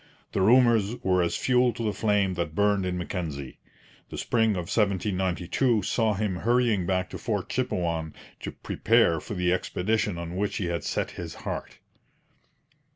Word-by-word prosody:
The 95 - 0
rumours 115 0 +4
were 90 -1 +3
as 85 -1 0
fuel 125 -1 +2
to 115 - -5
the 105 -2 0
flame 100 -3 +1
that 85 -3 -3
burned 100 -1 +2
in 90 0 -2
Mackenzie. 80 -6 -5 0.5
The - - -7
spring 110 -2 +2
of 90 - -2
1792 100 +3 +1
saw 110 +1 +1
him 100 -3 -1
hurrying 115 -3 +2
back 95 0 0
to - - -6
Fort 105 -6 -2
Chipewyan 85 -11 -2 0.2
to - - -5
prepare 80 -1 +2
for 105 - -7
the 90 -1 +1
expedition 100 +1 -1
on 85 +1 -5
which 100 +2 -1
he 95 - -2
had 85 -1 -2
set - - -2
his 85 -3 -7
heart. - - -5
95 Hz, 160 wpm, -27 LUFS, 90-110 Hz, 0.5 s, rumours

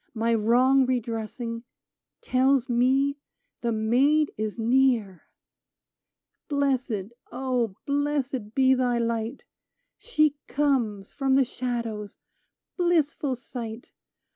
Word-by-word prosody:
My 230 +1 +1
wrong 250 +4 +4
redressing, 230 -1 -3 0.6
Tells 260 0 +2
me 265 +4 +2 0.4
the 235 - 0
Maid 260 +8 +2
is 215 0 -3
near! 230 -6 +1 1.2
Blessed, 255 -7 -1 0.2
O 250 -5 -1
blessM, 280 -5 -1
be 265 -1 +5
thy 250 -2 +1
light! 230 -1 -2 0.6
She 305 - +1
comes 245 -9 0
from 270 -2 +1
the 270 -1 +4
shadows 235 -4 -4 0.3
— - - -60
blissful 310 -6 +1
sight 240 -2 -8
250 Hz, 95 wpm, -26 LUFS, 230-275 Hz, 1.2 s, be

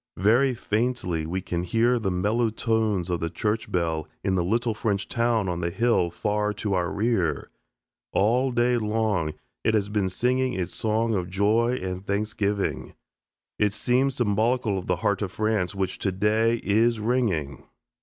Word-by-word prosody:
Very 120 +7 +3
faintly 105 -9 -1
we 95 +3 -2
can 90 -2 -3
hear 115 +7 +2
the 105 -4 -1
mellow 105 +6 +1
tones 110 -5 0
of 85 - 0
the 85 - -2
church 110 +4 -2
bell 80 -3 -1 0.2
in 95 -1 +1
the 90 -2 +1
little 115 +5 0
French 105 -2 -1
town 115 -3 +1
on 90 -1 -2
the 85 - 0
hill 115 -3 +2
far 105 +4 -1
to 105 0 -2
our 90 -2 0
rear. 100 - 0 0.6
All 125 +6 +2
day 120 0 +2
long 105 -8 0 0.3
it 110 - +2
has 100 -1 0
been 105 -3 0
singing 125 +6 0
its 90 -4 -3
song 110 +1 0
of 90 -3 -1
joy 110 +6 +2
and 95 0 -4
thanksgiving. 100 0 -2 0.6
It 105 -1 +2
seems 130 +3 +1
symbolical 110 0 +1
of 90 - -9
the 90 - +2
heart 100 - +2
of 95 -3 -2
France, 110 -3 0
which, 95 -1 -2
today, 105 +4 +1
is 115 +3 +2
ringing. 105 - -1
105 Hz, 165 wpm, -25 LUFS, 95-115 Hz, 0.6 s, Very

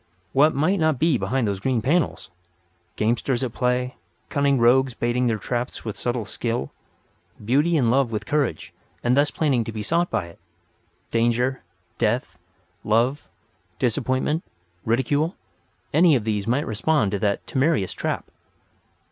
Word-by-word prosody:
What 150 +3 +4
might 170 +8 +2
not 155 -3 +2
be 155 -3 +2
behind 115 +5 0
those 100 -2 -2
green 125 +3 0
panels! 155 +8 0 0.6
Gamesters 120 +4 0
at 120 -3 -3
play; 125 0 -1 0.3
cunning 140 -1 +2
rogues 125 +1 +4
baiting 120 +1 0
their 115 -2 +1
traps 120 +4 -4
with 110 - -4
subtle 120 -2 -2
skill; 115 - -3 0.7
beauty 150 +8 +3
in 120 -5 +3
love 135 -1 +3
with 110 -1 -3
courage, 140 - -1 0.3
and 120 +1 +3
thus 145 +1 +3
planning 135 -7 +1
to 115 - -6
be 110 -1 -5
sought 170 +8 +1
by 105 -6 -1
it; 85 - -14 0.7
danger, 120 +3 +1 0.4
death, 105 -6 0 0.4
love, 120 +7 +1 0.5
disappointment, 130 +5 0 0.4
ridicule—any 150 - 0
of 120 - 0
these 105 -1 -2
might 130 +5 +1
respond 115 0 +1
to 100 - -1
that 100 -1 0
temerarious 130 - 0
rap. - - -1
125 Hz, 140 wpm, -23 LUFS, 115-140 Hz, 0.7 s, What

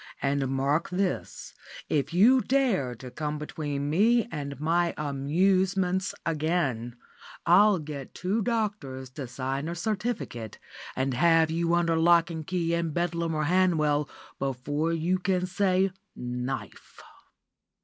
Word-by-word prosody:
And 140 0 0
mark 135 +4 0
this, 185 0 -3 0.3
if 150 +1 0
you 230 +9 +5
dare 235 - +1
to 125 +2 -10
come 150 +1 -3
between 145 -2 -4
me 230 +8 +3
and 140 -3 -5
my 170 +3 +1
amusements 185 +6 +1
again, 150 -7 -1 0.5
I'll 200 +4 +6
get 145 -4 -7
two 195 +5 -1
doctors 195 - -2
to 135 -1 -6
sign 135 +4 -3
a 170 - -3
certificate, 195 - -3 0.4
and 130 0 0
have 165 +4 +4
you 170 +1 +1
under 170 -1 +2
lock 170 +1 +4
and 160 -2 -6
key 170 -2 0
in 170 -1 0
Bedlam 170 -1 -1
or 155 - 0
Hanwell, 155 -4 +2 0.3
before 140 +4 -1
you 170 +3 0
can 180 -1 0
say 190 0 +1 0.2
'knife. 125 +2 -6
165 Hz, 130 wpm, -27 LUFS, 140-185 Hz, 0.5 s, I'll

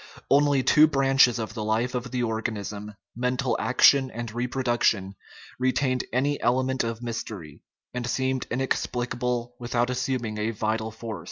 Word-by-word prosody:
Only 140 -1 +4
two 155 +4 +6
branches 135 -4 +4
of 110 -2 -4
the 110 -2 -4
life 110 +4 0
of 125 0 -3
the 125 0 -1
organism, 105 -2 -4 0.2
mental 125 +2 0
action 130 +1 +5
and 115 -2 -6
reproduction, 120 -5 0 0.5
retained 130 0 +1
any 140 +3 0
element 130 +1 +1
of 115 0 -4
mystery, 105 -10 -6 0.3
and 125 -1 -3
seemed 130 0 -1
inexplicable 125 -1 -2
without 120 0 0
assuming 125 -4 -2
a 105 +1 0
vital 110 0 -2
force. 110 -1 -7
120 Hz, 140 wpm, -26 LUFS, 110-130 Hz, 0.5 s, two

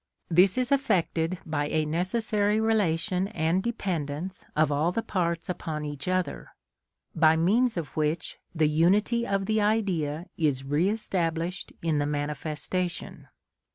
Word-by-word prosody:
This 180 +5 +5
is 255 0 0
effected 185 -10 +1
by 145 -2 -1
a 155 0 0
necessary 205 +6 0
relation 195 -4 +1
and 170 0 0
dependence 180 -6 -3
of 155 -1 +3
all 150 +4 +1
the 225 +5 -2
parts 170 -3 -1
upon 160 -4 -4
each 145 0 -5
other, 185 0 -2 0.6
by 160 -1 +5
means 215 +8 +2
of 160 -4 -5
which 155 +2 -1 0.2
the 155 -1 +3
unity 200 +10 +2
of 195 -1 0
the 215 +1 +1
Idea 180 -8 0
is 145 -5 +1
re 145 +7 +1
established 175 -4 -2
in 160 -3 +1
the 145 - 0
manifestation. 150 +4 -3
170 Hz, 135 wpm, -27 LUFS, 155-200 Hz, 0.6 s, This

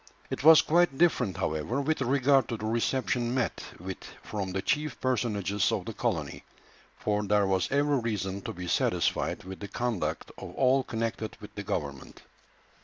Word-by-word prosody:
It - - -3
was 160 +1 +9
quite 170 -4 +3
different, 125 - +2
however, 80 - -1
with 150 +1 0
regard 135 +1 +3
to 115 - -2
the 110 - -5
reception 120 +2 0
met 125 -3 -1 0.2
with 95 +2 -6 0.2
from 100 -3 -4
the 95 +1 -2
chief 150 +4 -1
personages 105 -6 0
of - - -1
the - - -5
colony, - - -2 0.5
for 105 0 0
there 105 0 +3
was 95 -1 0
every 145 0 +2
reason 100 -4 -2
to - - -5
be 90 0 -6
satisfied - - 0
with 95 +1 -8
the 100 - -6
conduct 120 -2 -2
of - - -8
all 130 0 +3
connected 115 -2 -3
with 105 -1 -11
the 105 - -5
government. 70 -8 -5
115 Hz, 170 wpm, -29 LUFS, 95-135 Hz, 0.5 s, was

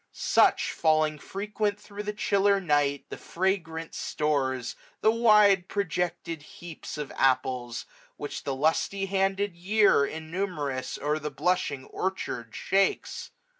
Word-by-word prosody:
6^^ - - -30
Such, - - +3
falling 155 -1 +2
frequent 205 +3 -2
thro' 205 0 -8
the 210 0 -3
chiller 200 -1 +2
night, 145 -5 +1
The - - -7
fragrant 165 -3 -2
stores, 130 -5 -1 0.3
the 220 - +5
wide 210 -5 +5
projected 175 -4 -2
heaps 160 +1 -9
Of 150 -2 -5
apples, 130 -2 +1 0.3
which 145 - -5
the 135 - -2
lusty 160 +7 +1
handed 195 0 0
year, 200 -2 +4
Innumerous, 155 -4 -3
o'er 150 +2 -1
the 150 0 -4
blushing 180 -8 -1
orchard 125 - -4
shakes. 195 0 0
170 Hz, 125 wpm, -27 LUFS, 145-195 Hz, 0.3 s, the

